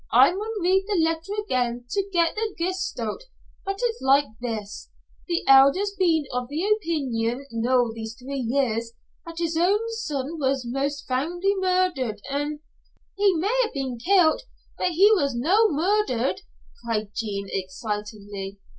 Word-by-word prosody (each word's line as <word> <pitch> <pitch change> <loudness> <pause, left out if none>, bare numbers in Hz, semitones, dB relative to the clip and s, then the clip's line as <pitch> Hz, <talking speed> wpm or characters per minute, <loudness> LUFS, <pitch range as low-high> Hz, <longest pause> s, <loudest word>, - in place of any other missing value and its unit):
I 255 +7 +7
maun 430 +4 -4
read 380 +2 +3
the 405 -4 +1
letter 325 +3 0
again 245 - -1
to 395 -1 -1
get 340 -2 +2
the 435 -1 -3
gist 370 -3 -2
o't, 230 - -4 0.4
but 390 0 -3
it's 470 -1 -1
like 275 +2 +4 0.2
this. 220 -4 -5 0.4
The 340 -1 -1
Elder's 275 +10 +6
been 335 -5 +2
of 250 0 -2
the 300 +6 -3
opeenion 280 - 0
noo 235 0 +1
these 220 0 -7
three 270 +3 -6
years 235 -2 0 0.3
that 330 0 -8
his 335 -1 -1
son 345 - -1
was 265 -2 0
most 280 +3 -2
foully 345 +10 0
murder't, 365 - 0
an 295 +1 -2 0.3
" - - -42
"He 405 -1 +5
may 395 +9 0
ha'e 455 - 0
been 260 -3 -3
kill't, 350 - +4 0.3
but - - 0
he 395 +6 +6
was 280 - +2
no' 385 - +3
murder't," 340 - 0 0.4
cried 215 -3 -2
Jean, 200 -3 -3
excitedly. 205 0 -5
285 Hz, 150 wpm, -25 LUFS, 240-370 Hz, 0.4 s, I